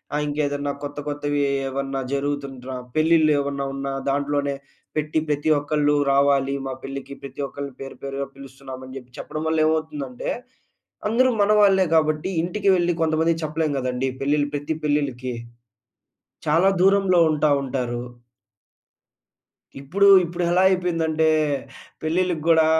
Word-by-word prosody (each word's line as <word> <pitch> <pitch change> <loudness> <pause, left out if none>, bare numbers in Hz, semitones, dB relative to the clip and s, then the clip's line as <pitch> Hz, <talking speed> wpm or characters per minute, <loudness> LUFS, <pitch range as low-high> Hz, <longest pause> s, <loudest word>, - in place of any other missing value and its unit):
ఆహ్, 150 - 0
ఇంకేదైనా 145 -1 -1
కొత్త 145 0 -5
కొత్తవి 145 0 -1 0.3
ఏవన్నా 135 0 -3
జరుగుతున్ర 140 -2 -3 0.2
పెళ్ళిళ్ళు 155 0 +4
ఏవన్నా 140 0 -2
ఉన్నా 135 0 -3 0.2
దాంట్లోనే. 140 0 0 0.4
పెట్టి 155 +1 0
ప్రతి 150 +1 0
ఒక్కళ్ళు 145 0 +1 0.2
రావాలి. 140 0 +3
మా 135 - -3
పెళ్ళికి 140 0 -6
ప్రతి 135 +1 -9
ఒక్కరిని 140 -1 -7
పేరు 135 0 -8
పేరుగా 140 0 -3
పిలుస్తున్నాం. 135 -1 -10
అని 130 +1 -10
చెప్పి 125 -1 -12
చెప్పడం 155 +1 -5
వల్ల 160 0 +1
ఏమవుతుందంటే 155 -5 -2 0.8
అందరూ 255 +3 +3
మనవాళ్లే 200 -2 +5
కాబట్టి 155 +1 +2
ఇంటికి 195 +3 -1
వెళ్లి 175 0 +2
కొంతమందికి 160 +1 +1
చెప్పలేం 155 0 -1
గదండీ! 130 0 -1
పెళ్లిలు 145 +1 +2
ప్రతి 145 +2 -2
పెళ్లిళ్లకి. 135 -4 -1 1.1
చాలా 170 +5 +4
దూరంలో 195 -2 +4
ఉంటా 150 0 +2
ఉంటారు. 125 -2 -3 1.8
ఇప్పుడు 195 +9 +3 0.2
ఇప్పుడెలా 175 +1 +1
అయిపోయిందంటే 165 -4 +1 0.7
పెళ్ళిళ్ళకి 170 0 0
గూడా 160 -1 +5
145 Hz, 120 wpm, -23 LUFS, 140-160 Hz, 1.8 s, మనవాళ్లే